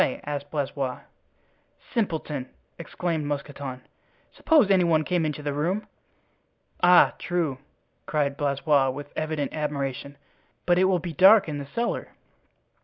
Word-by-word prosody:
asked 145 -1 -4
Blaisois. 140 -3 -3 0.9
"Simpleton!" 160 - -2 0.3
exclaimed 170 -1 -3
Mousqueton; 140 -2 -5 0.5
"suppose 290 -11 +3
any 185 -2 +5
one 160 -2 +2
came 170 -1 0
into 150 0 -5
the 145 -1 -2
room." 175 +9 -1 1.0
"Ah, 180 0 +6
true," 165 -7 -2 0.5
cried 145 -2 0
Blaisois, 140 -1 +1
with 145 +2 -7
evident 155 -2 -2
admiration; 140 -2 -4 0.5
"but 175 0 +3
it 185 - +4
will 185 -1 +3
be 170 0 -6
dark 195 +4 +7
in 150 -2 -4
the 140 - -7
cellar." 235 +11 -2
150 Hz, 125 wpm, -25 LUFS, 140-175 Hz, 1.0 s, dark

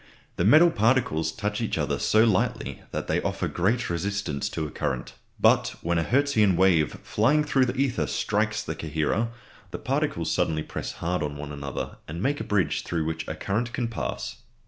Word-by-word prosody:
The - - +1
metal 160 +10 +7
particles 110 - +2
touch 105 +4 -3
each 115 - -1
other - - -1
so 110 +1 +4
lightly 110 -5 0
that - - -3
they - - 0
offer - - -1
great 110 +7 0
resistance 95 -3 -2
to 80 - -3
a 75 - -6
current. 65 -1 -3 0.3
But - - +4
when 85 0 +1
a - - +1
Hertzian 120 - +3
wave 85 -4 +3
flying 145 +8 +2
through 135 -3 +3
the 125 +1 -2
ether 135 -2 +1
strikes 105 0 0
the 80 - -3
coherer, 80 +8 -1 0.4
the - - -5
particles - - -1
suddenly 80 -1 0
press - - -5
hard 90 +2 -2
on 75 -1 -3
one 75 0 -6
another, 70 -2 -5
and 80 +2 -6
make 140 +8 0
a - - -3
bridge 105 -3 +1
through 80 -2 -2
which 80 0 -3
a 80 - -3
current 110 +8 -2
can 120 -2 -1
pass. 115 - -4
100 Hz, 190 wpm, -26 LUFS, 80-115 Hz, 0.4 s, metal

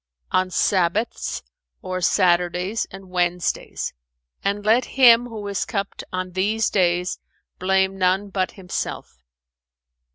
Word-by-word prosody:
"On 185 0 +2
Sabbaths 190 +4 0 0.4
or 185 0 -3
Saturdays 180 +3 +2
and 195 -1 -12
Wednesdays; 175 -1 -1 0.5
and 205 +1 -1
let 230 +3 +4
him 245 -2 +7
who 215 -3 -7
is 200 -1 -1
cupped 200 -1 -4
on 185 0 -3
these 210 +4 0
days 180 -1 +1 0.4
blame 190 +1 +1
none 190 +2 +2
but 185 -1 -1
himself. 180 - -5
190 Hz, 110 wpm, -23 LUFS, 180-205 Hz, 0.5 s, him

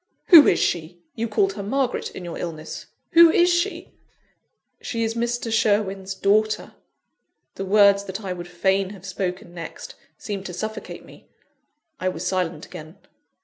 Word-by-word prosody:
"Who 330 -6 +10
is - - +4
she? 170 +1 -2
You 230 +1 -3
called 195 -3 +1
her 200 - -6
Margaret, 255 +5 -1
in 180 - -7
your 170 - -6
illness 160 -2 -7 0.2
who 335 0 +8
is 350 +2 +4
she?" 345 +4 -2 0.9
"She 230 -4 -3
is 225 0 -1
Mr. 235 0 -2
Sherwin's 195 -3 0
daughter 215 +2 +1 0.4
" - - -54
The 195 - -5
words 200 0 +5
that 190 +3 -6
I 190 -2 -3
would 175 -1 -8
fain 190 +2 0
have 195 -2 -13
spoken 185 0 -4
next, 170 -1 -8 0.2
seemed 200 -2 -5
to 180 - -7
suffocate 215 +4 -6
me. - - -17 0.7
I 185 - 0
was 180 0 -6
silent 180 -4 -2
again. 160 0 -11
195 Hz, 160 wpm, -23 LUFS, 180-220 Hz, 0.9 s, Who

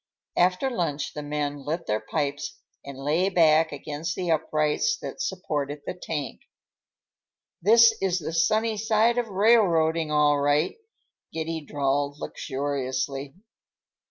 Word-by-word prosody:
After 180 +9 +2
lunch 160 - -2
the 150 - -5
men 145 -1 -3
lit 165 +4 -3
their 105 0 0
pipes 145 0 -3 0.3
and 140 -1 -9
lay 155 +7 +1
back 160 -3 +4
against 150 +4 -5
the 180 -2 -1
uprights 155 - +1
that - - -7
supported 145 -6 -3
the - - -3
tank. 160 -6 -5 1.2
"This 225 +4 +7
is 190 -2 +1
the 160 -1 -4
sunny 215 +6 +2
side 225 +2 +2
of 240 - -2
railroading, 180 -7 +3
all 150 -1 +3
right," 145 - +2 0.6
Giddy 160 0 -3
drawled 145 0 -1
luxuriously. 135 0 -3
155 Hz, 125 wpm, -26 LUFS, 145-185 Hz, 1.2 s, This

